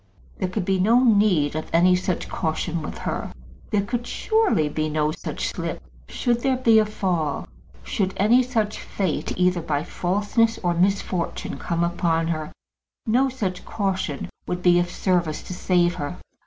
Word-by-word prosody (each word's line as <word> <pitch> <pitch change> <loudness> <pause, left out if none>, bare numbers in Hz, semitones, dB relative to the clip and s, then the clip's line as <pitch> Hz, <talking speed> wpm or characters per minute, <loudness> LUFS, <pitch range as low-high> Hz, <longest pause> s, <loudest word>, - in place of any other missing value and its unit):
There 185 - -1
could 185 0 -2
be 190 0 +1
no 230 +7 +4
need 200 - +3
of 155 - -4
any 180 +2 +5
such 180 0 -2
caution 165 +1 -2
with 150 - -6
her. - - -3 0.4
There 205 -2 +1
could 240 +3 -3
surely 435 - +1
be 155 +1 -2
no 150 0 +1
such - - -4
slip! - - -4 0.3
Should 240 -2 0
there 265 0 +1
be 230 -3 +5
such 215 - +2
a - - -11
fall, 170 -8 -1 0.4
should 185 - -1
any 230 +6 +5
such 225 -4 -1
fate, 185 -7 -2
either 180 -1 +2
by 150 -2 -1
falseness 205 +7 0
or 175 -1 +2
misfortune, 185 -1 -1
come 170 0 -1
upon 170 -1 0
her, 155 -2 -3 0.5
no 255 +4 +3
such 195 -8 -3
caution 190 -8 -2 0.2
could 180 0 -3
be 175 -1 +5
of 175 0 0
service 175 -4 0
to - - -7
save 175 -1 +2
her. 145 -3 -5
180 Hz, 170 wpm, -24 LUFS, 170-215 Hz, 0.5 s, any